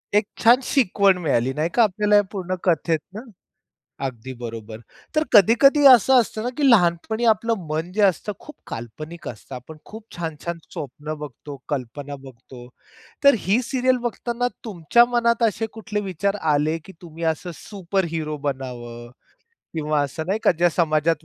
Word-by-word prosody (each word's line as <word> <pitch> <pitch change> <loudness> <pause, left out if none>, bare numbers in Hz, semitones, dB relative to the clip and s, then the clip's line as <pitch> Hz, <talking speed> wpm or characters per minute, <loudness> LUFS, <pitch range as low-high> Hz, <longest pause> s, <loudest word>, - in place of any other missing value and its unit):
एक 210 - +4 0.2
छान 240 +3 +7
शिकवण 200 -8 +3
मिळाली 130 -4 +1
नाही 155 +4 -1
का? 235 - +5
आपल्याला 210 0 +3
पूर्ण 185 -2 -3
कथेतनं. 175 +3 -1 0.8
अगदी 130 0 -6
बरोबर. 115 -2 -7 0.4
तर 310 - +3
कधी-कधी 275 - +6
असं 260 +1 +7
असतं 220 -1 -2
ना 245 - -1
की 280 -3 +3
लहानपणी 215 +3 +2
आपलं 230 +1 +2 0.2
मन 160 +3 -3
जे 215 - +1
असतं 195 +2 +1
खूप 300 - -12
काल्पनिक 155 +9 -8
असतं. 125 +3 -8
आपण 155 +5 -10
खूप 220 0 -11
छान-छान 170 0 -5 0.2
स्वप्न 150 +2 -6
बघतो, 145 0 -9
कल्पना 140 +1 -5
बघतो. 125 -1 -13 0.6
तर 280 - +8
ही 205 +7 +1
सीरियल 255 0 +1
बघताना 240 +1 -3 0.2
तुमच्या 215 +4 +3
मनात 235 -1 +1
असे 220 +2 -2
कुठले 215 -1 -4
विचार 200 +4 -1
आले, 155 +1 +1
की 190 - -11
तुम्ही 165 -1 -9
असं 175 +3 -7
सुपर 195 -2 -3
हिरो 155 -2 -3
बनावं 120 -3 -6 0.7
किंवा 155 -1 0
असं 155 +3 -4
नाही 200 +3 0
का? - - +4
ज्या 175 +1 +2
समाजात 160 -1 +1
170 Hz, 155 wpm, -22 LUFS, 150-220 Hz, 0.8 s, तर